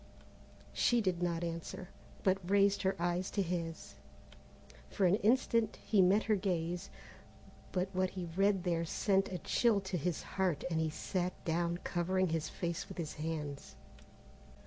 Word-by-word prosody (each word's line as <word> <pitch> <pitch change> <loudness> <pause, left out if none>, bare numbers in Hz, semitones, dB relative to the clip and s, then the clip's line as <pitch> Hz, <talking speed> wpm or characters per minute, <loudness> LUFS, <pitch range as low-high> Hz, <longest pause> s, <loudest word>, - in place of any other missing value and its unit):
She 240 - +3
did 185 -5 0
not 170 -1 0
answer, 170 +2 -5 0.3
but 190 0 +3
raised 200 0 +4
her 190 0 +1
eyes 175 +2 0
to 200 - 0
his. 165 -2 -4 1.0
For 195 - +1
an 180 +3 +5
instant 230 0 +2
he 205 -3 +4
met 195 +4 +4
her 215 - +2
gaze, 180 -2 -2 0.8
but 185 0 0
what 185 0 +1
he 185 -1 -5
read 195 -1 +3
there 170 -2 +1
sent 195 +4 +1
a 180 - -2
chill 220 +5 +2
to 190 -1 -3
his 170 +1 -2
heart 185 -6 -1
and 160 - +1
he 160 - +1
sat 180 +3 -2
down 170 +1 0
covering 185 +1 +1
his 160 -1 -1
face 170 -2 -3
with 190 - -9
his 160 -3 -3
hands. 150 -2 -5
180 Hz, 155 wpm, -34 LUFS, 170-195 Hz, 1.0 s, an